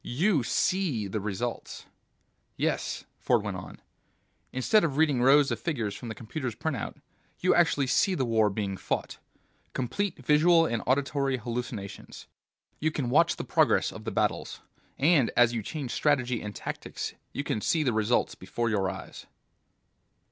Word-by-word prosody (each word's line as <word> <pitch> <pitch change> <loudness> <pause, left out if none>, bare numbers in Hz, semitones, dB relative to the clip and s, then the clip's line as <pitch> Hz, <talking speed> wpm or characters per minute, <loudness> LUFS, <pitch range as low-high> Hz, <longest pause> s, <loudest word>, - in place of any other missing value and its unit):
You 155 - +1
see 140 - 0
the 105 +3 -3
results." 105 +4 -4 0.7
"Yes," - - -1 0.2
Ford - - +2
went - - -3
on. - - -10 0.7
"Instead 150 - +3
of 145 -4 -1
reading 150 -6 +3
rows 140 +3 +5
of - - -2
figures 120 -12 -2
from 120 - -7
the 110 - -5
computer's 120 +2 -5
printer... 140 -9 -3 0.4
you 185 - +3
actually 165 -5 +3
see 185 +8 +2
the 130 - 0
war 110 -2 +3
being 100 -1 -3
fought. - - -3 0.5
Complete 160 - -2
visual 165 +3 +5
and 115 -7 -1
auditory 135 0 +1
hallucinations. 120 -4 -6 0.5
You 155 - +1
can 140 -5 -3
watch 165 +5 +4
the - - -5
progress - - +2
of - - -10
the - - -1
battles, - - -1 0.4
and 145 -4 +4
as 120 -1 +5
you 115 - -1
change 135 +3 -5
strategy 125 -5 +1
and 105 -1 -6
tactics - - -5 0.2
you 140 - -3
can 110 - -2
see 160 +6 +1
the 125 -5 +1
results 110 +2 +1
before 120 -1 -3
your 95 -3 +1
eyes." - - -8
130 Hz, 155 wpm, -28 LUFS, 115-155 Hz, 0.7 s, rows